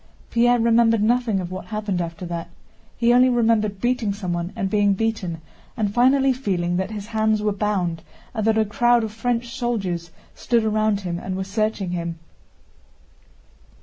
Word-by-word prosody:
Pierre 240 +1 +4
remembered 230 -1 +3
nothing 235 -3 +2
of 180 -1 -5
what 185 0 -6
happened 210 -4 -2
after 170 +1 -5
that. 170 -1 -5 0.5
He 235 0 +3
only 250 +1 +6
remembered 225 -4 +1
beating 240 -3 0
someone 175 -3 -3
and 195 - -1
being 205 0 +2
beaten 190 -6 -2 0.4
and 205 -2 -1
finally 265 +3 +4
feeling 180 -9 -1
that 190 +1 -1
his 210 -2 -6
hands 220 -1 0
were 210 - +2
bound 190 -5 -1 0.3
and 220 - -2
that 220 0 +3
a 220 - +3
crowd 240 +2 +3
of 220 - -3
French 235 +1 -2
soldiers 195 -9 -2 0.2
stood 235 -2 0
around 215 -1 +1
him 175 -2 -3
and 185 +1 -4
were 190 - -2
searching 205 -1 -1
him. 170 -1 -3
215 Hz, 165 wpm, -22 LUFS, 190-230 Hz, 0.5 s, only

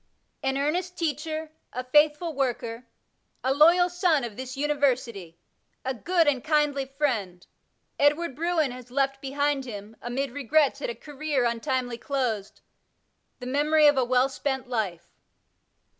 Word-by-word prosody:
An 265 0 0
earnest 350 +6 -1
teacher, 310 0 -3 0.2
a 250 - -4
faithful 300 +5 +3
worker, 245 -3 -2 0.6
a 260 - +2
loyal 340 +5 +6
son 355 -5 +2
of 230 -3 -5
this 260 +2 -7
University, 255 - 0 0.5
a 265 - 0
good 335 +6 +1
and 270 -4 +1
kindly 295 -3 +1
friend, 245 -11 -2 0.5
Edward 290 0 +2
Bruen 325 -3 +1
has 250 0 -10
left 270 +1 0
behind 280 0 0
him, 210 -2 -8
amid 255 +3 -2
regrets 285 +1 +2
at - - -2
a 235 - -4
career 295 -3 -2
untimely 240 +1 -1
closed, 235 -8 -2 0.8
the 250 - -9
memory 300 +4 +3
of 290 0 +7
a 260 - +3
well 250 +1 +3
spent 265 -1 -3
life. 200 -9 -2
275 Hz, 140 wpm, -26 LUFS, 245-300 Hz, 0.8 s, of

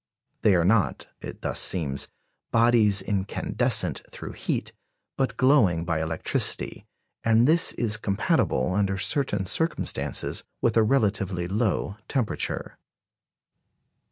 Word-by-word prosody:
They 105 -3 +4
are 85 -1 +2
not, 105 0 +1 0.2
it - - -9
thus - - -1
seems, 70 -7 0 0.4
bodies 115 -4 +3
incandescent 100 0 0
through - - -8
heat, - - -3 0.4
but 135 -1 -2
glowing 110 - +3
by 85 -2 -1
electricity; 80 0 -1 0.4
and 115 +2 +4
this 165 +2 +4
is 105 -3 0
compatible, 105 - 0
under 95 -1 0
certain 105 0 -1
circumstances, 160 - 0 0.2
with 115 - +1
a 115 - +5
relatively 105 -7 0
low 105 0 -1
temperature. 130 -6 -2
105 Hz, 110 wpm, -25 LUFS, 95-115 Hz, 0.4 s, a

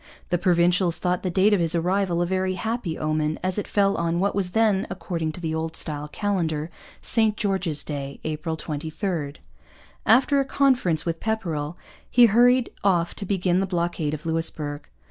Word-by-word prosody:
The 175 - +1
Provincials 175 0 +3
thought 180 0 0
the 185 - -2
date 195 +4 +3
of 205 - +3
his 170 0 +2
arrival 175 0 +1
a - - 0
very 185 +1 -1
happy 220 -5 -3
omen, 155 0 -1
as 185 +2 0
it - - -4
fell 200 -1 +2
on 170 0 0
what 200 +2 +1
was 185 -3 -2
then, 215 -4 +2
according 170 -4 -3
to - - -8
the 160 -2 -3
Old 160 0 -3
Style 150 -1 -3
calendar, 165 -4 -2 0.3
St 220 -2 +2
George's 190 -7 0
Day, 140 -2 -5
April 155 +1 -3
23. 155 0 -3 0.7
After 270 +5 +5
a - - +3
conference 255 - +2
with 165 -1 -2
Pepperrell 170 -8 -2 0.3
he 245 -1 +7
hurried 245 +3 +4
off 175 -4 +2
to 200 - -6
begin 185 -2 +1
the 195 - 0
blockade 170 -4 -1
of 150 - -11
Louisbourg. 160 -3 -2
175 Hz, 175 wpm, -24 LUFS, 160-200 Hz, 0.7 s, he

